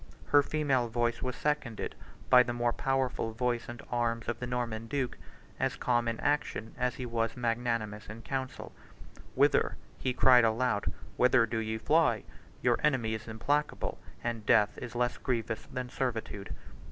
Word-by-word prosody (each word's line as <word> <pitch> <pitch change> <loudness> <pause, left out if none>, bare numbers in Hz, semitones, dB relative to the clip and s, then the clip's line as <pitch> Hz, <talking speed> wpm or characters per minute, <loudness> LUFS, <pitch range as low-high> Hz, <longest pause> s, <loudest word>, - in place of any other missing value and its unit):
74 - - -19
Her 145 - +8
female 140 -4 +1
voice 120 0 0
was 125 -1 -2
seconded 145 -7 -2 0.3
by 125 -1 +8
the 125 -1 -1
more 120 0 +1
powerful 130 -4 0
voice 120 0 -1
and 120 -1 -8
arm 115 -1 0
of 120 -1 -3
the 125 - -4
Norman 115 -2 -2
duke, 135 -1 -1 0.4
as - - 0
calm 120 -1 +1
in 115 -1 -1
action 145 -6 -1
as 125 0 0
he 125 - -5
was 115 0 -1
magnanimous 115 -3 -1
in 110 +2 -8
council: 130 -1 -4 0.6
"Whither," - - +3 0.2
he 130 - 0
cried 125 -1 +6
aloud, 115 -1 +1 0.3
"whither 125 -1 +5
do 115 0 -2
ye 110 0 -2
fly? 120 -3 +3 0.4
Your - - +3
enemy 130 -7 +2
is 110 +1 -5
implacable; 145 +7 -1 0.2
and 115 -2 -2
death 105 -1 +4
is 120 -1 -7
less 120 0 0
grievous 115 -3 -2
than 125 0 -4
servitude." 110 -6 -3
120 Hz, 165 wpm, -31 LUFS, 115-125 Hz, 0.6 s, Her